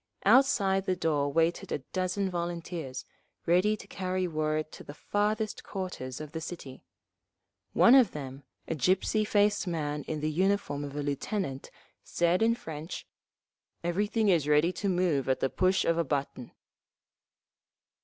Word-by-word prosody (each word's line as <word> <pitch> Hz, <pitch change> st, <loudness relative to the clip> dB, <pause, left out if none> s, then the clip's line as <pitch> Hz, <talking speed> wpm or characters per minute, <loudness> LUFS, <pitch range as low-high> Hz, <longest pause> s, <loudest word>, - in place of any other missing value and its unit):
Outside 200 Hz, -5 st, +4 dB
the 185 Hz, -, +2 dB
door 150 Hz, -5 st, 0 dB
waited 165 Hz, +2 st, +1 dB
a -, -, +1 dB, 0.2 s
dozen 185 Hz, +1 st, 0 dB
volunteers, 170 Hz, -6 st, -4 dB, 0.4 s
ready 185 Hz, +5 st, +3 dB
to -, -, -11 dB
carry 185 Hz, -1 st, -2 dB
word 155 Hz, -1 st, -1 dB
to -, -, -10 dB
the 145 Hz, -, -10 dB
farthest 210 Hz, +4 st, -1 dB
quarters 180 Hz, -10 st, -5 dB
of 155 Hz, -1 st, -7 dB
the 160 Hz, -, -5 dB
city. 150 Hz, -6 st, -8 dB, 0.9 s
One 235 Hz, -, +6 dB
of 260 Hz, -6 st, +7 dB
them, 135 Hz, -2 st, -7 dB, 0.3 s
a -, -, -1 dB
gypsy 190 Hz, -, +1 dB
faced 205 Hz, -1 st, +2 dB
man 150 Hz, -3 st, -2 dB
in 155 Hz, -, -3 dB
the 155 Hz, +1 st, -1 dB
uniform 185 Hz, -4 st, 0 dB
of 140 Hz, 0 st, -7 dB
a 145 Hz, -, -2 dB
lieutenant, 140 Hz, -, -3 dB, 0.3 s
said 175 Hz, +2 st, +1 dB
in 230 Hz, +1 st, +4 dB
French, 160 Hz, -6 st, -7 dB, 0.8 s
"Everything 205 Hz, +5 st, 0 dB
is 165 Hz, -6 st, +3 dB
ready 150 Hz, +4 st, +4 dB
to 200 Hz, -, -2 dB
move 175 Hz, -8 st, +1 dB
at 130 Hz, -, +2 dB
the 135 Hz, -, 0 dB
push 185 Hz, +1 st, +2 dB
of 165 Hz, 0 st, +2 dB
a -, -, +3 dB
button…." 140 Hz, -4 st, -3 dB
170 Hz, 150 wpm, -29 LUFS, 150-195 Hz, 0.9 s, of